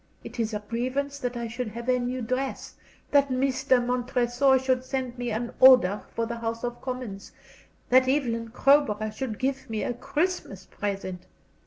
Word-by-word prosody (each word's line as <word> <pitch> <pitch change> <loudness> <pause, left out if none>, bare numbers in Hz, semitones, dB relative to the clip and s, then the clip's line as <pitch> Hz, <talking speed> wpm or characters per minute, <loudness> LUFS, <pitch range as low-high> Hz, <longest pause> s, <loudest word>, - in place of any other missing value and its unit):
It - - -9
is 225 -1 0
a 210 -1 -4
grievance 265 +5 -2
that 245 -2 -3
I 235 -1 -3
should 240 +2 -4
have 235 +3 -7
a 250 0 +3
new 250 0 -2
dress, 255 +3 -3 0.4
that 280 -1 +4
Mr. 260 -1 +2
Montresor 250 +2 +2
should 260 -1 0
send 260 -2 -3
me 245 -1 -3
an 235 +2 -3
order 250 -7 +7
for 230 - 0
the 235 +1 -4
House 230 0 -4
of 240 0 -4
Commons, 250 -7 -6 0.6
that 255 +1 +5
Evelyn 235 -5 0
Crowborough 250 -4 +3
should 220 0 -4
give 265 0 -2
me 220 -1 -2
a - - -1
Christmas 270 - -2
present. 185 -2 -5
245 Hz, 170 wpm, -26 LUFS, 230-260 Hz, 0.6 s, order